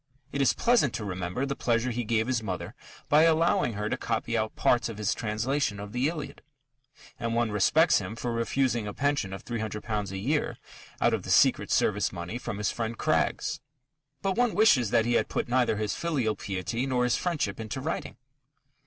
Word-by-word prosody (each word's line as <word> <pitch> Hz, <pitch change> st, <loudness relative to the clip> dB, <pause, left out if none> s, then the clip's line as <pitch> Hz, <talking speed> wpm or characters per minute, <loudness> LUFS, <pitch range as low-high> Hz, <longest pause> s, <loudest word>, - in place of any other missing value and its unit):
It 140 Hz, -, -1 dB
is 135 Hz, -, +4 dB
pleasant 235 Hz, -, +2 dB
to 110 Hz, -, -4 dB
remember 90 Hz, +6 st, -3 dB
the 140 Hz, 0 st, -3 dB
pleasure 120 Hz, 0 st, 0 dB
he 120 Hz, +1 st, -2 dB
gave 110 Hz, 0 st, +1 dB
his 125 Hz, -2 st, 0 dB
mother 95 Hz, -5 st, -4 dB, 0.3 s
by 150 Hz, +1 st, +5 dB
allowing 165 Hz, -6 st, +3 dB
her 105 Hz, +1 st, -3 dB
to -, -, 0 dB
copy 115 Hz, -, -2 dB
out 110 Hz, -1 st, -1 dB
parts 120 Hz, -1 st, +2 dB
of 110 Hz, -, -7 dB
his 105 Hz, -1 st, 0 dB
translation 110 Hz, +1 st, -1 dB
of 100 Hz, 0 st, -7 dB
the 125 Hz, +4 st, +1 dB
Iliad, 155 Hz, -3 st, -6 dB, 0.8 s
and 115 Hz, -1 st, -2 dB
one 120 Hz, -2 st, +1 dB
respects 150 Hz, -, +4 dB
him 100 Hz, +2 st, -6 dB
for 120 Hz, +1 st, -3 dB
refusing 115 Hz, -1 st, 0 dB
a 105 Hz, -, -6 dB
pension 140 Hz, -9 st, 0 dB
of 95 Hz, -, -8 dB
£300 110 Hz, -2 st, -3 dB
a 95 Hz, -, -4 dB
year 145 Hz, +10 st, -1 dB, 0.4 s
out -, -, +3 dB
of -, -, 0 dB
the -, -, -9 dB
secret -, -, +4 dB
service -, -, +2 dB
money 90 Hz, +8 st, -5 dB
from 100 Hz, -, -5 dB
his 105 Hz, -, 0 dB
friend 115 Hz, -1 st, -3 dB
Craggs. -, -, 0 dB, 0.6 s
But 195 Hz, -1 st, 0 dB
one 245 Hz, -2 st, +2 dB
wishes 145 Hz, -, +5 dB
that 110 Hz, -, +3 dB
he 120 Hz, -, +1 dB
had -, -, +2 dB
put -, -, -2 dB
neither 120 Hz, -3 st, +2 dB
his 105 Hz, -1 st, -1 dB
filial 135 Hz, -11 st, -1 dB
piety 100 Hz, +7 st, -3 dB
nor 125 Hz, -2 st, +1 dB
his 125 Hz, -1 st, +2 dB
friendship 150 Hz, -, -2 dB
into 110 Hz, +3 st, -4 dB
writing. 160 Hz, +5 st, -4 dB
115 Hz, 195 wpm, -28 LUFS, 105-135 Hz, 0.8 s, by